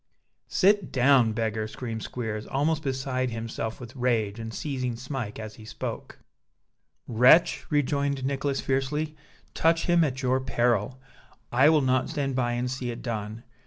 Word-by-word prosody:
"Sit 200 0 +3
down, 125 -3 +4
beggar!" 110 -1 -1
screamed 115 0 -5
Squeers, 110 -3 -4
almost 150 +3 0
beside 130 -2 -1
himself 115 -1 -4
with 120 0 -10
rage, 115 -4 0
and 115 0 -5
seizing 130 -1 -3
Smike 125 -3 -5
as 110 -1 -7
he 110 - -12
spoke. 110 - -6 0.9
"Wretch," 125 +9 +5
rejoined 140 -2 0
Nicholas, 140 0 -1
fiercely, 150 +3 -1 0.4
"touch 165 0 +2
him 175 -1 +4
at 135 -2 -2
your 130 +1 +2
peril! 120 -1 0 0.5
I 130 +5 +5
will 155 -3 +4
not 130 -1 +1
stand 135 -3 -2
by 120 -2 0
and 125 +1 -1
see 130 -1 -3
it 120 0 -6
done. 110 -1 -4
130 Hz, 150 wpm, -27 LUFS, 115-140 Hz, 0.9 s, Wretch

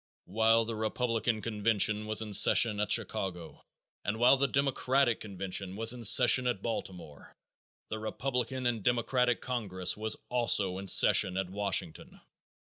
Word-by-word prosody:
_ - - - 0.2
While 115 +3 +1
the 115 - -6
Republican 115 0 -3
convention 105 -1 -1
was 110 0 -1
in 105 -1 -9
session 105 +1 +4
at 105 0 -2
Chicago 95 -6 -3 0.4
and 105 +2 -4
while 120 +3 +4
the 140 +1 -1
Democratic 135 -2 -1
convention 95 -1 -4
was 115 +2 +2
in 120 -1 -10
session 125 +3 +6
at 110 -6 -3
Baltimore, 90 -9 -8 0.5
the 110 - -6
Republican 125 +3 -4
and 120 -3 -2
Democratic 120 +2 -1
congress 100 -8 -2
was 110 0 -1
also 105 -6 -1
in 100 - -9
session 95 0 +5
at 95 -1 -4
Washington. 100 -5 -2
110 Hz, 145 wpm, -29 LUFS, 100-120 Hz, 0.5 s, session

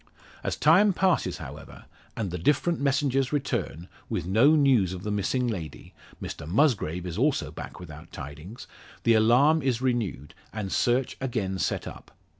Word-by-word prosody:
As - - -1
time 190 +7 +5
passes, 185 -1 +1
however, - - -10 0.3
and 100 -5 -2
the 90 - -4
different 150 - +1
messengers 135 -1 +1
return, 130 - -2 0.2
with - - -2
no 115 - +4
news 130 - +3
of 90 0 -7
the 105 - -3
missing 105 +5 0
lady 85 -10 -6 0.3
Mr 75 - -7
Musgrave 90 - +1
is 90 +2 -4
also 145 +2 +1
back - - -9
without 80 -2 -11
tidings 75 - -9 0.4
the 115 - +4
alarm 125 +9 +4
is 130 -4 0
renewed, 115 - -2 0.2
and 105 -3 -5
search 125 +1 +1
again 105 -8 -2
set - - -1
up. - - -10
115 Hz, 155 wpm, -26 LUFS, 90-140 Hz, 0.4 s, time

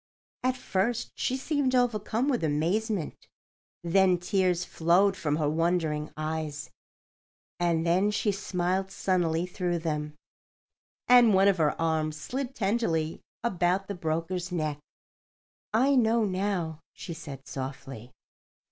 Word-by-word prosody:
At 255 0 0
first 230 +1 -1
she 260 - -1
seemed 270 -2 0
overcome 235 0 +1
with 250 - 0
amazement; 170 +5 -1 0.6
then 185 +1 +4
tears 180 0 +1
flowed 180 +4 +3
from 150 -5 -1
her 150 -1 0
wondering 160 -1 0
eyes; 155 -1 -4 0.9
and 170 -1 +1
then 185 +4 +3
she 210 0 +1
smiled 190 -1 -1
sunnily 175 -4 0
through 180 -1 -2
them, 150 -2 -3 0.9
and 240 -4 +7
one 195 +1 +5
of 195 -2 +4
her 150 -2 +1
arms 155 -1 0
slid 265 - -4
tenderly 190 -7 0 0.2
about 190 -3 +1
the 200 - -3
broker's 170 +1 -2
neck. 155 -4 -2 0.9
"I 260 +6 +3
know 230 -2 +3
now," 185 -5 -2
she 170 - -7
said, 140 -4 -9
softly. 130 -3 -7
180 Hz, 120 wpm, -28 LUFS, 160-205 Hz, 0.9 s, and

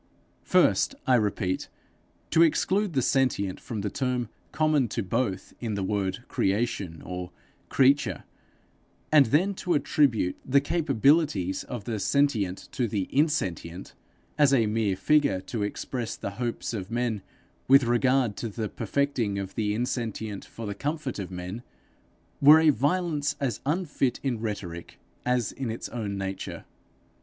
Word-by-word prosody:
First, - - +3
I 130 - +3
repeat, 105 -5 0 0.6
to 165 - +5
exclude 190 +4 +2
the 130 -3 +1
sentient 115 -9 +1
from 110 -3 -5
the 100 -1 -3
term 125 -4 -1 0.2
common 155 -5 +2
to 115 +1 -3
both 100 -2 -2
in 110 -4 -3
the 100 - -2
word 100 +2 -2
creation 100 -5 -1
or 90 0 -5 0.4
creature 140 +1 +3 0.9
and 145 -4 +7
then 175 - +2
to 180 -2 -1
attribute 130 -11 +2
the 140 +2 +4
capabilities 140 - +2
of 120 -4 -6
the 110 -2 -3
sentient 110 -8 +1
to 125 - -1
the 100 -3 -2
insentient, 95 - -1 0.5
as 145 -2 +6
a 115 -4 +3
mere 105 -2 0
figure 140 +1 +2
to 105 +4 -5
express 115 +3 -3
the 100 - -5
hopes 120 +3 -3
of 100 -3 -4
men 115 -3 -1 0.5
with 135 +1 +7
regard 120 -1 +2
to 115 - -3
the 110 0 -4
perfecting 135 -8 -1
of 95 -1 -4
the 105 -1 -1
insentient 110 -4 -3
for 115 - -8
the 105 - -3
comfort 145 +2 -3
of 95 - -5
men, 90 +5 -6 0.8
were 150 +3 +9
a 160 -1 +5
violence 150 +2 0
as 135 -4 -1
unfit 150 -5 0
in 125 -5 -1
rhetoric 100 -6 -6 0.3
as 125 -3 +1
in 130 -3 -4
its 110 - -5
own 105 -4 -4
nature. 95 -1 -5
120 Hz, 145 wpm, -27 LUFS, 100-140 Hz, 0.9 s, were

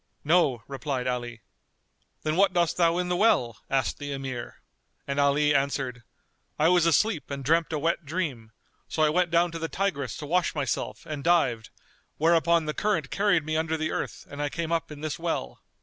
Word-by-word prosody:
"No," 145 -8 +3
replied 135 -1 -3
Ali; 120 -2 -3 0.8
"Then 155 0 0
what 195 +1 +4
dost 170 -2 +2
thou 170 -1 +3
in 180 0 0
the 180 - 0
well?" 130 - +2
asked 135 -2 0
the 145 -1 -5
Emir; 135 -3 -6 0.4
and 140 0 -2
Ali 145 +1 +3
answered, 135 -3 -1 0.6
"I 155 +2 +4
was 175 -2 +4
asleep 165 0 +2
and 140 -1 -5
dreamt 165 +3 +2
a 155 - 0
wet 165 +3 0
dream;[FN#233] 145 -8 -3 0.4
so 155 - 0
I 155 - +5
went 175 +3 +2
down 170 +1 +3
to 165 - -5
the 165 0 -3
Tigris 145 - -2
to 150 - -6
wash 175 +3 +1
myself 145 -3 -3
and 150 -2 -5
dived, 150 -10 +2 0.5
whereupon 165 +1 +3
the 150 - -2
current 165 -9 -1
carried 195 -6 +2
me 155 0 -2
under 160 0 0
the 155 0 -2
earth - - -4
and 145 +1 -7
I 145 - 0
came 165 +2 -4
up 165 -1 -1
in 150 -1 -9
this 155 -2 -3
well." 165 - -3
155 Hz, 195 wpm, -27 LUFS, 140-170 Hz, 0.8 s, I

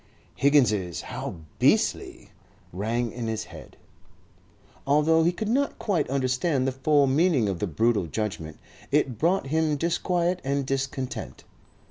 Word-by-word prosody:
Higgins's 105 - +2
"How - - -6 0.2
beastly!" - - +1 0.4
rang 115 +5 -1
in 120 -1 -5
his 110 0 -2
head. - - -13 1.1
Although 155 +3 +4
he 170 - +3
could 210 +4 -4
not 275 +6 0
quite 180 - -1
understand 130 +1 0
the - - +1
full 140 +2 +3
meaning 140 - +2
of 95 -3 -2
the 105 - -1
brutal 105 +3 +1
judgment, 80 -5 -4 0.3
it 135 -6 +1
brought 175 +2 +2
him 160 -2 +1
disquiet 175 +2 0
and 140 0 -1
discontent. 135 -1 -4
135 Hz, 130 wpm, -26 LUFS, 115-160 Hz, 1.1 s, Although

